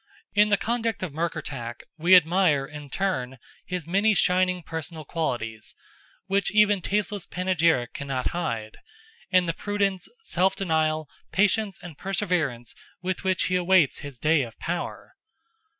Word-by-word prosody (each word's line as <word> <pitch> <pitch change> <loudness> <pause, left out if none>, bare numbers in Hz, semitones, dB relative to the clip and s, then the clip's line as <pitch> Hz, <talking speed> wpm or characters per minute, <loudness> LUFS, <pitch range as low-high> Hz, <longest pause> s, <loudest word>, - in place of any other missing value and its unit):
In 210 +1 +5
the 205 - +4
conduct 230 -1 -1
of 170 -6 -4
Murkertach, 135 -7 -4
we 170 +4 +6
admire, 170 -4 +4
in 145 0 -10
turn, 135 -7 -2 0.3
his 180 -3 -3
many 200 +5 +3
shining 180 -1 +2
personal 160 -1 -6
qualities, 120 -9 -3 0.5
which 195 0 +1
even 210 -2 +4
tasteless 205 0 -1
panegyric 170 -8 +1
cannot 135 -2 -2
hide, 115 -11 -3 0.5
and 185 -2 +4
the 165 - 0
prudence, 200 -1 -1 0.2
self 190 - +1
denial, 155 -4 0 0.2
patience, 205 0 +2
and 165 -5 -10
preservance 175 - -1 0.3
with 185 +1 -2
which 190 -1 +1
he 185 - 0
awaits 180 -4 +3
his 140 -3 -8
day 155 +3 +3
of 115 -3 -6
power. 175 +1 -5
175 Hz, 135 wpm, -26 LUFS, 150-195 Hz, 0.5 s, we